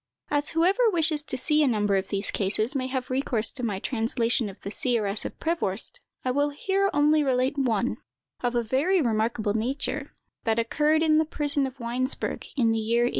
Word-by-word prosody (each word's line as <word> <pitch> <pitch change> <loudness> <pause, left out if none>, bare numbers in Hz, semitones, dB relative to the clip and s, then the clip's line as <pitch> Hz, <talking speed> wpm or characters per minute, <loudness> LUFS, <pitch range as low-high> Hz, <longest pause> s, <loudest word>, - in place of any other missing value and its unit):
As 290 0 +1
whoever 390 +8 +4
wishes 320 -5 +1
to 260 - -3
see 300 +4 +2
a 295 - +4
number 210 -4 +1
of 190 0 -1
these 200 0 -2
cases 215 +5 0
may 260 -1 -1
have 260 -1 -4
recourse 250 -4 +1
to 265 - -8
my 215 -5 -1
translation 230 0 0
of 195 - -12
the 200 - -6
"Seeress 215 -4 0
of - - -7
Prevorst," 275 - +1 0.3
I 255 - +1
will 285 +3 +1
here 390 +7 0
only 300 +1 +3
relate 260 0 +1
one, 245 -3 0 0.4
of 245 -1 -1
a 240 - +1
very 285 - +1
remarkable 220 -4 0
nature, 270 +5 -2 0.3
that 225 -1 +1
occurred 300 +7 +2
in 310 -1 +4
the 315 - +2
prison 290 -2 0
of 265 +1 -10
Weinsberg, 245 +3 -2
in 230 -4 +3
the 225 - 0
year 230 +2 +1
1835. 240 - +2
255 Hz, 195 wpm, -26 LUFS, 225-295 Hz, 0.4 s, whoever